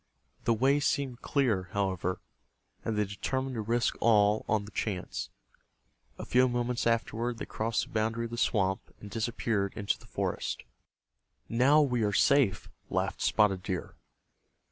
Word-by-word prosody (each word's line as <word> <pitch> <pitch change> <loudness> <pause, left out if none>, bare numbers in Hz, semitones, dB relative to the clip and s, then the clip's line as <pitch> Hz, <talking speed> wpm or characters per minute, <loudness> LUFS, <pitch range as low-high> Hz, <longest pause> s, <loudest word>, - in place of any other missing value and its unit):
The 115 - +4
way 135 +5 +3
seemed 135 -3 -1
clear, 110 - +1
however, 95 -2 -1 0.6
and 110 -2 -2
they 105 - +2
determined 130 +7 -3
to 115 - -2
risk 115 +2 +1
all 105 -2 +4
on 105 -1 +1
the 105 - -11
chance. 95 -5 -3 0.9
A - - -6
few 125 +1 +4
moments 120 0 -1
afterward 115 +1 0
they - - -5
crossed 110 +1 -1
the - - -11
boundary 115 +1 0
of 115 - -7
the - - -3
swamp, 95 -5 +1 0.2
and 100 - -10
disappeared 110 -3 -1
into 100 -2 -1
the - - -17
forest. - - -3 0.8
"Now 135 +6 +5
we 125 -5 +1
are 105 -1 +1
safe," 120 -5 +3 0.2
laughed - - -1
Spotted 100 -4 +3
Deer. 90 -1 -4
115 Hz, 150 wpm, -30 LUFS, 100-120 Hz, 0.9 s, Now